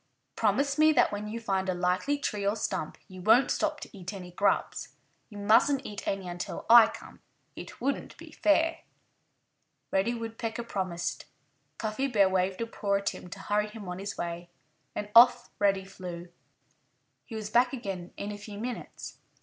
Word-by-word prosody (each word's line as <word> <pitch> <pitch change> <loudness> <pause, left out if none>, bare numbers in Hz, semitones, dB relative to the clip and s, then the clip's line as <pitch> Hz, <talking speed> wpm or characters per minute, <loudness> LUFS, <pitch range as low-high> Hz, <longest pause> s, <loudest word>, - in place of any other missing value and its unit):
"Promise 275 +7 +1
me 310 0 +7
that - - +4
when 205 +1 -4
you 225 +2 -4
find 195 -4 -1
a 185 - 0
likely 180 +11 +1
tree 210 -7 -3
or 200 +2 +1
stump 220 - -3
you 185 -2 -10
won't 230 +7 +5
stop - - 0
to - - -10
eat 185 0 -6
any 180 -2 -8
grubs. 200 +3 0 0.3
You 210 - -10
mustn't 225 +7 +4
eat 205 -1 -7
any 195 -2 -2
until 175 0 -5
I 235 -2 +10
come. - - -11 0.4
It - - -9
wouldn't 275 +3 -2
be - - -12
fair." 320 +1 +2 1.1
Reddy 210 +5 +1
Woodpecker 230 0 -4
promised. 185 -6 -3 0.5
Cuffy 220 +5 -1
Bear 205 -7 +4
waved 185 +2 0
a - - 0
paw 205 -3 -1
at 200 0 +1
him 180 - -9
to - - -8
hurry 210 +1 0
him 210 -2 -9
on 180 +1 -5
his 200 +1 -5
way. 175 0 -4 0.5
And 210 - -3
off 240 +1 +7
Reddy 195 -2 +2
flew. 180 -2 -8 1.0
He 225 - -8
was 215 -1 -5
back 245 +1 +4
again 195 -9 -5
in 205 - -4
a 205 - -7
few 205 0 -9
minutes. 240 +2 -6
205 Hz, 175 wpm, -29 LUFS, 190-230 Hz, 1.1 s, I